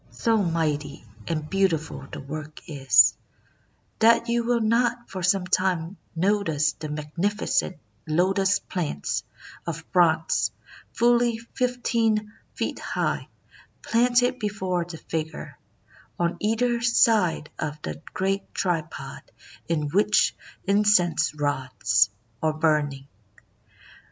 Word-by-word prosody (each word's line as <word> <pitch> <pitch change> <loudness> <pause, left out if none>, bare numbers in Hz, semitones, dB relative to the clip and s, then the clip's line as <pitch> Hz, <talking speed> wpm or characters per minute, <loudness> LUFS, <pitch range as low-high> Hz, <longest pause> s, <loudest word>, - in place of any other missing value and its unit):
''So 225 -3 +1
mighty 150 -5 -2 0.2
and 155 -2 -2
beautiful 170 -4 -1
the 150 - -6
work 155 +2 -7
is, 135 - +5 0.8
that 230 +1 +4
you 235 0 +1
will 240 0 +1
not 235 +2 +1
for 190 - -5
some 185 +1 +2
time 180 -1 0 0.2
notice 160 -5 +1
the 155 -1 -7
magnificent 170 +5 -1 0.3
lotus 190 +5 +2
plants 155 - -3 0.4
of - - -4
bronze, 165 -3 +3 0.4
fully 240 0 +3
fifteen 230 -3 -1 0.2
feet - - -3
high, - - -2 0.6
planted 245 +2 +2
before 190 -4 -1
the 170 -1 -8
figure, 160 0 -5 0.6
on 170 0 0
either 235 +2 +1
side 220 -9 +3
of 150 0 -3
the 75 0 -5
great 195 +1 -2
tripod 165 -4 -3 0.5
in 150 -3 -1
which 210 +6 +3 0.3
incense 200 -6 +3
rods 130 -7 +1 0.3
are 155 -1 +1
burning. 150 -3 0
180 Hz, 105 wpm, -25 LUFS, 155-215 Hz, 0.8 s, is